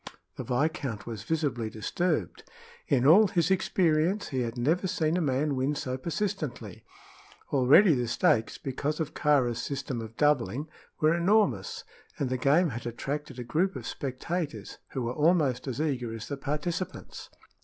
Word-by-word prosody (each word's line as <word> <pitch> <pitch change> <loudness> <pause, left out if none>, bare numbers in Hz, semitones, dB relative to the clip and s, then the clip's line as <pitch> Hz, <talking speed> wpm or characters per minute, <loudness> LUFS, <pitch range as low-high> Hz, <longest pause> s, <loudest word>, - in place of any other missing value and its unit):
The - - -5
viscount 130 -4 -1
was 115 -3 -6
visibly 135 -4 -1
disturbed. 115 - -2 0.4
In 130 -2 +2
all 195 +9 +7
his 180 -1 +1
experience 180 0 +1
he 130 -3 -1
had 120 0 -3
never 160 +10 +1
seen 160 -2 0
a 180 - +1
man 140 0 0
win 135 +3 0
so 130 -2 -3
persistently. 145 - -4 0.7
Already 145 +8 +6
the 125 -3 -1
stakes, 115 -1 +1
because 145 +3 -3
of 155 -2 -3
Kāra's 130 -6 +2
system 135 -3 -4
of 110 0 -9
doubling, 145 0 +1 0.3
were 155 +1 +4
enormous, 170 - +1 0.3
and 130 -3 -2
the 130 - 0
game 150 +6 +3
had 120 -1 -5
attracted 135 +3 -4
a 125 - -4
group 170 +11 0
of - - -6
spectators, 150 +4 -4
who 130 - -4
were 120 +1 -2
almost 150 -5 +2
as 130 +1 -3
eager 130 -7 -1
as 115 - -8
the 140 - -2
participants. 150 +6 -4
140 Hz, 155 wpm, -28 LUFS, 125-160 Hz, 0.7 s, all